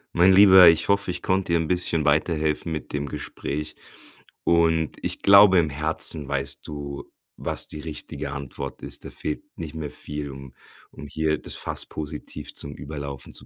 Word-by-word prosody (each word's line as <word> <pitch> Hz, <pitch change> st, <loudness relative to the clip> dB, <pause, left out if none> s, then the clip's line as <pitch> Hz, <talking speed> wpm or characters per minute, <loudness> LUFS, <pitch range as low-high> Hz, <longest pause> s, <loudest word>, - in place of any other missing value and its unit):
Mein 90 Hz, +3 st, +6 dB
Lieber, 95 Hz, -2 st, +9 dB
ich 80 Hz, +3 st, +4 dB
hoffe, 100 Hz, -1 st, +2 dB
ich 90 Hz, -, -3 dB
konnte 95 Hz, -2 st, 0 dB
dir -, -, +5 dB
'n 80 Hz, -, -2 dB
bisschen 90 Hz, -3 st, 0 dB
weiterhelfen 75 Hz, +1 st, +1 dB
mit 75 Hz, -, -6 dB
dem 70 Hz, 0 st, -2 dB
Gespräch. 75 Hz, +2 st, -5 dB, 0.7 s
Und 80 Hz, -2 st, +2 dB
ich -, -, -4 dB
glaube 100 Hz, -1 st, +7 dB
im 80 Hz, -3 st, +3 dB
Herzen, 75 Hz, 0 st, -3 dB
weißt 70 Hz, -1 st, -2 dB
du, 70 Hz, -2 st, -7 dB, 0.3 s
was -, -, -1 dB
die 75 Hz, -, -8 dB
richtige 75 Hz, -2 st, -6 dB
Antwort 70 Hz, -1 st, -7 dB
ist. -, -, -7 dB
Da -, -, -6 dB
fehlt 75 Hz, -, -4 dB, 0.2 s
nicht 80 Hz, -2 st, -6 dB
mehr 80 Hz, -2 st, -5 dB
viel, 75 Hz, 0 st, -6 dB
um 70 Hz, -1 st, -11 dB, 0.4 s
um 75 Hz, -, -10 dB
hier 80 Hz, +1 st, 0 dB
das -, -, -2 dB
Fass -, -, -1 dB
positiv 75 Hz, 0 st, -7 dB
zum 70 Hz, 0 st, -5 dB
Überlaufen 70 Hz, -2 st, -7 dB
zu -, -, -4 dB
75 Hz, 175 wpm, -24 LUFS, 70-85 Hz, 0.7 s, Lieber